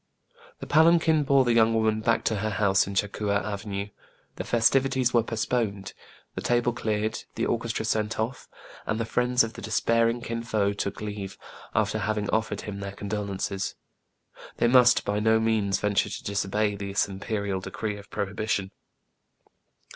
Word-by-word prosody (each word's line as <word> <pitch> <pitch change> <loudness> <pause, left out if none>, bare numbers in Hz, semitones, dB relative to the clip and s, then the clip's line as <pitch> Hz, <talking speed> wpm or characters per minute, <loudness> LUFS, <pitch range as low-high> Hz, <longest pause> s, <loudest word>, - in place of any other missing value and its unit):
" 480 0 -25
The - - -5
palanquin 160 0 +4
bore 140 -2 +4
the 120 - +3
young 115 0 +4
woman 110 -1 +2
back 115 +1 +1
to 110 - 0
her 110 +2 -1
house 100 -2 +2
in 100 - -5
Cha 100 - +3
Coua 100 0 -1
Avenue; 100 -1 -4 0.5
the - - -4
festivities 130 +1 +2
were 120 - +5
postponed, 110 -3 -2 0.4
the - - -5
tables 120 0 +1
cleared, 110 -2 -2
the - - 0
orchestra 115 -1 -1
sent 110 0 -1
off; 115 +4 -3 0.4
and 110 - -1
the 115 - -1
friends 125 +1 +2
of 115 0 -4
the - - -9
despairing 115 +3 +1
Kin 115 0 -4
Fo 105 -3 0
took 100 0 -4
leave, 105 -2 -5 0.4
after 110 0 +1
having 105 0 -1
offered 110 0 -1
him 100 -2 -6
their 100 0 -5
con 100 0 -7
dolences. 100 -1 -3 0.8
They - - +3
must, 125 0 +5
by 105 +1 0
no 110 +1 +3
means, 110 -3 +1
venture 105 -1 +1
to - - -6
disobey 100 +1 0
this 100 0 -1
imperial 100 0 -3
decree 105 +2 -4
of 100 - -13
prohibition. 100 -1 -2
110 Hz, 170 wpm, -26 LUFS, 100-115 Hz, 0.8 s, were